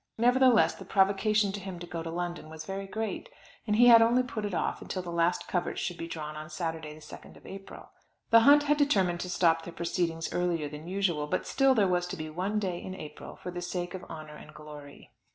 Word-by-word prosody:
Nevertheless 245 Hz, 0 st, +4 dB
the -, -, -11 dB
provocation 200 Hz, +1 st, +2 dB
to 205 Hz, -, -5 dB
him 190 Hz, -2 st, -7 dB
to 175 Hz, -, -7 dB
go 170 Hz, -1 st, -5 dB
to 165 Hz, -, -5 dB
London 175 Hz, -1 st, -4 dB
was 160 Hz, 0 st, -9 dB
very 195 Hz, +2 st, -5 dB
great, 220 Hz, -, -4 dB, 0.4 s
and 210 Hz, -, +2 dB
he 240 Hz, +3 st, +6 dB
had 235 Hz, -1 st, +9 dB
only 240 Hz, +3 st, +4 dB
put 220 Hz, -4 st, -5 dB
it 205 Hz, -, -4 dB
off -, -, -2 dB
till 185 Hz, -, -3 dB
the 175 Hz, -, -6 dB
last 170 Hz, +1 st, 0 dB
coverts 175 Hz, -1 st, -2 dB
should 175 Hz, -, -4 dB
be 165 Hz, -, -4 dB
drawn 155 Hz, -2 st, -6 dB
on 155 Hz, 0 st, -8 dB
Saturday 160 Hz, -2 st, -4 dB
the 155 Hz, -, -15 dB
2nd 150 Hz, -, -12 dB
of -, -, -19 dB
April. 195 Hz, 0 st, -10 dB, 0.4 s
The 230 Hz, -, +9 dB
hunt 285 Hz, +5 st, +6 dB
had 295 Hz, 0 st, +2 dB
determined 195 Hz, -12 st, +2 dB
to 180 Hz, -, -4 dB
stop 165 Hz, -2 st, +3 dB
their 170 Hz, -, -8 dB
proceedings 165 Hz, -1 st, -2 dB
earlier 175 Hz, -4 st, 0 dB
than 150 Hz, +2 st, -9 dB
usual; 180 Hz, -6 st, 0 dB
but -, -, -1 dB
still 270 Hz, -1 st, +3 dB
there 205 Hz, -4 st, +3 dB
was 180 Hz, -1 st, 0 dB
to 190 Hz, -, -6 dB
be 155 Hz, -1 st, -6 dB
one 190 Hz, +6 st, -2 dB
day 185 Hz, -4 st, -2 dB
in 185 Hz, -, -7 dB
April, 150 Hz, -5 st, -9 dB
for 180 Hz, -, -7 dB
the 175 Hz, 0 st, -5 dB
sake 175 Hz, 0 st, -4 dB
of 185 Hz, -, -7 dB
honour 155 Hz, -1 st, -9 dB
and 150 Hz, -, -14 dB
glory. 150 Hz, -2 st, -12 dB
180 Hz, 235 wpm, -29 LUFS, 165-205 Hz, 0.4 s, had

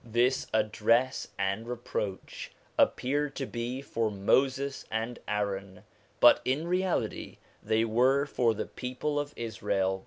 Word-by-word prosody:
This 120 Hz, +3 st, +1 dB
address 110 Hz, +4 st, +2 dB
and 100 Hz, +3 st, -1 dB
reproach 115 Hz, -5 st, -4 dB, 0.3 s
appeared 145 Hz, +3 st, +1 dB
to 135 Hz, -, -2 dB
be 125 Hz, +2 st, -4 dB
for 115 Hz, -4 st, -1 dB
Moses 130 Hz, +7 st, +1 dB
and 115 Hz, +2 st, -3 dB
Aaron, 100 Hz, -2 st, -3 dB, 0.4 s
but -, -, +7 dB
in 145 Hz, +6 st, 0 dB
reality 185 Hz, +1 st, -1 dB, 0.2 s
they 110 Hz, +1 st, +2 dB
were 130 Hz, +5 st, +3 dB
for 120 Hz, -5 st, +1 dB
the -, -, -3 dB
people 130 Hz, +4 st, -3 dB
of 145 Hz, 0 st, -3 dB
Israel. 100 Hz, -4 st, -1 dB
120 Hz, 125 wpm, -29 LUFS, 105-135 Hz, 0.4 s, but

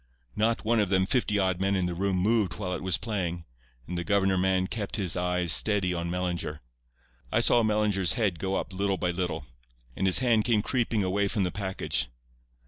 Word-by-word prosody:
Not 115 Hz, +1 st, 0 dB
one 115 Hz, +1 st, +2 dB
of 105 Hz, -3 st, +1 dB
them 95 Hz, -1 st, +3 dB
fifty 105 Hz, -1 st, +1 dB
odd 95 Hz, -2 st, 0 dB
men 100 Hz, +1 st, +1 dB
in 95 Hz, -2 st, 0 dB
the 90 Hz, -, -2 dB
room 95 Hz, +2 st, -1 dB
moved 100 Hz, -1 st, +1 dB
while 90 Hz, 0 st, -4 dB
it -, -, -4 dB
was 95 Hz, -2 st, +1 dB
playing, 90 Hz, -6 st, -3 dB, 0.4 s
and 90 Hz, -, -5 dB
the 85 Hz, -, -2 dB
governor 95 Hz, 0 st, +2 dB
man 95 Hz, 0 st, +1 dB
kept 100 Hz, +1 st, -4 dB
his 95 Hz, -6 st, 0 dB
eyes 90 Hz, -1 st, +1 dB
steady 95 Hz, +1 st, +2 dB
on 85 Hz, 0 st, -3 dB
Mellinger. 85 Hz, -4 st, -3 dB, 0.7 s
I -, -, +3 dB
saw 120 Hz, -, +4 dB
Mellinger's 105 Hz, -4 st, +1 dB
head 100 Hz, -9 st, 0 dB
go 95 Hz, 0 st, -1 dB
up 95 Hz, -, -3 dB
little 100 Hz, 0 st, 0 dB
by 90 Hz, -1 st, 0 dB
little, 85 Hz, -4 st, -3 dB, 0.5 s
and 95 Hz, -, 0 dB
his 95 Hz, -, +5 dB
hand 120 Hz, -4 st, +3 dB
came 110 Hz, -3 st, +2 dB
creeping 115 Hz, -4 st, 0 dB
away 100 Hz, +2 st, +1 dB
from 100 Hz, 0 st, 0 dB
the 90 Hz, -, -1 dB
package. 95 Hz, -10 st, -1 dB
95 Hz, 205 wpm, -27 LUFS, 90-105 Hz, 0.7 s, his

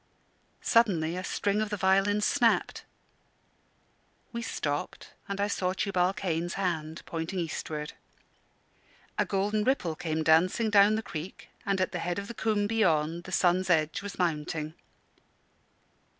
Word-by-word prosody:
Suddenly 180 Hz, -9 st, +3 dB
a 185 Hz, -, -4 dB
string 205 Hz, +2 st, 0 dB
of 215 Hz, -, -1 dB
the 210 Hz, -, -2 dB
violin 195 Hz, +2 st, +3 dB
snapped. 235 Hz, +1 st, +2 dB, 1.5 s
We 235 Hz, -, -3 dB
stopped, 150 Hz, -7 st, -4 dB, 0.2 s
and 200 Hz, 0 st, -3 dB
I 200 Hz, -, +2 dB
saw 185 Hz, -2 st, -1 dB
Tubal 185 Hz, -2 st, +1 dB
Cain's 175 Hz, -2 st, -2 dB
hand 165 Hz, -4 st, -2 dB
pointing 165 Hz, +3 st, -4 dB
eastward. 155 Hz, -3 st, -4 dB, 1.3 s
A -, -, +3 dB
golden 205 Hz, +2 st, 0 dB
ripple 210 Hz, -, 0 dB
came 160 Hz, 0 st, -2 dB
dancing 180 Hz, +8 st, +3 dB
down 205 Hz, +1 st, +6 dB
the 220 Hz, -, -2 dB
creek, 160 Hz, +1 st, -7 dB, 0.2 s
and, 195 Hz, -1 st, +1 dB
at 185 Hz, -, 0 dB
the 175 Hz, -, -3 dB
head 175 Hz, +2 st, -2 dB
of 200 Hz, 0 st, -4 dB
the 235 Hz, -, -6 dB
combe 215 Hz, -2 st, 0 dB
beyond, 170 Hz, -6 st, +1 dB
the 185 Hz, -, -8 dB
sun's 185 Hz, +1 st, +2 dB
edge 160 Hz, +2 st, +2 dB
was 205 Hz, -1 st, -7 dB
mounting. 155 Hz, -2 st, -1 dB
185 Hz, 140 wpm, -29 LUFS, 165-205 Hz, 1.5 s, down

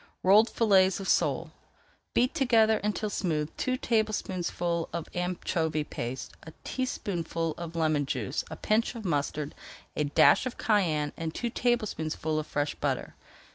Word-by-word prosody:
ROLLED 210 Hz, +5 st, +6 dB
FILLETS 195 Hz, -4 st, +4 dB
OF 195 Hz, -, -5 dB
SOLE -, -, +1 dB, 0.6 s
Beat 250 Hz, +2 st, +3 dB
together 230 Hz, -7 st, +4 dB
until 210 Hz, +1 st, -1 dB
smooth 155 Hz, -6 st, -1 dB
two 255 Hz, 0 st, -1 dB
tablespoonfuls 185 Hz, -7 st, -1 dB
of 170 Hz, -2 st, -4 dB
anchovy 170 Hz, -3 st, -1 dB
paste, 130 Hz, -2 st, -5 dB
a 160 Hz, -, -11 dB
teaspoonful 170 Hz, -10 st, -2 dB
of 170 Hz, -1 st, -7 dB
lemon 155 Hz, -3 st, +1 dB
juice, 130 Hz, 0 st, -2 dB
a -, -, -6 dB
pinch 225 Hz, +3 st, 0 dB
of 225 Hz, -3 st, -7 dB
mustard, 150 Hz, -2 st, -1 dB, 0.4 s
a 150 Hz, -, +1 dB
dash 145 Hz, -, +5 dB
of 250 Hz, -, -6 dB
cayenne, 160 Hz, -9 st, +1 dB
and 160 Hz, -1 st, -4 dB
two 240 Hz, -1 st, -2 dB
tablespoonfuls 160 Hz, -11 st, -1 dB
of 155 Hz, -, -5 dB
fresh 145 Hz, 0 st, -1 dB
butter. -, -, -2 dB
175 Hz, 140 wpm, -29 LUFS, 155-215 Hz, 0.6 s, ROLLED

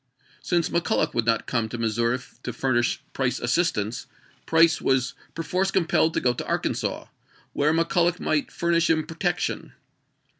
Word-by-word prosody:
Since 175 Hz, -1 st, 0 dB
McCuUoch 170 Hz, -, 0 dB
would 120 Hz, -1 st, 0 dB
not 115 Hz, -1 st, +2 dB
come 115 Hz, -3 st, -1 dB
to 120 Hz, -, -5 dB
Missouri 115 Hz, +2 st, +1 dB, 0.2 s
to -, -, -4 dB
furnish 120 Hz, -3 st, 0 dB
Price 125 Hz, -2 st, 0 dB
assistance, 120 Hz, -, 0 dB, 0.4 s
Price 165 Hz, 0 st, +4 dB
was 125 Hz, -2 st, +1 dB, 0.2 s
per 165 Hz, -, -3 dB
force 185 Hz, +3 st, 0 dB
compelled 170 Hz, -3 st, +2 dB
to -, -, +3 dB
go 125 Hz, -, +2 dB
to -, -, -6 dB
Arkansas, -, -, -2 dB, 0.5 s
where 145 Hz, +2 st, +2 dB
McCul 165 Hz, +2 st, +2 dB
loch 175 Hz, +1 st, 0 dB
might 155 Hz, -2 st, 0 dB
furnish 170 Hz, 0 st, +1 dB
him 155 Hz, -1 st, +2 dB
protection. 170 Hz, +2 st, -2 dB
155 Hz, 155 wpm, -25 LUFS, 120-170 Hz, 0.5 s, Price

